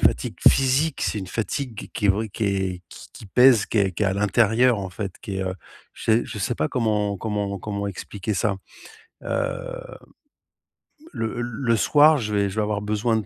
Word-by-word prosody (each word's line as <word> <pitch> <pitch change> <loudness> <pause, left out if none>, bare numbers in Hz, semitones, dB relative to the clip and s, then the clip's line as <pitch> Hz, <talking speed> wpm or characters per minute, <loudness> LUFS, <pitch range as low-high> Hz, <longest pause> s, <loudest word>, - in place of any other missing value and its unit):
fatigue - - +1
physique, 135 +3 +2
c'est 105 - -1
une 95 - -6
fatigue 115 +1 -4
qui 105 - -1
est - - +2
vraie, 110 +3 -1
qui 110 - -3
est 95 -2 -1
qui - - -12
qui - - -12
pèse, 125 +1 +5
qui 110 - -1
est 95 -2 +2
qui 105 - -1
est - - +2
à 95 - +1
l'intérieur 115 +3 +3
en 95 - -4
fait, 95 0 -5
qui 100 -2 -5
est, 95 - -1
heu, 95 0 -3 0.4
je - - -11
sais 115 +1 +3
je - - -7
sais 110 +5 -1
pas 155 - 0
comment 105 -6 0
comment 105 -2 -2
comment 100 +1 -4
expliquer 100 +2 -5
ça. 100 0 0 0.7
Heu, - - -4 1.2
le 115 +1 -3
l 120 - -1
le 120 0 0
soir, 150 +9 +5
je 105 -2 -2
vais 100 -1 +2
je 95 - -8
vais 110 - +1
avoir 105 -1 -1
besoin 110 +2 0
de 110 - -3
105 Hz, 210 wpm, -23 LUFS, 100-120 Hz, 1.2 s, pèse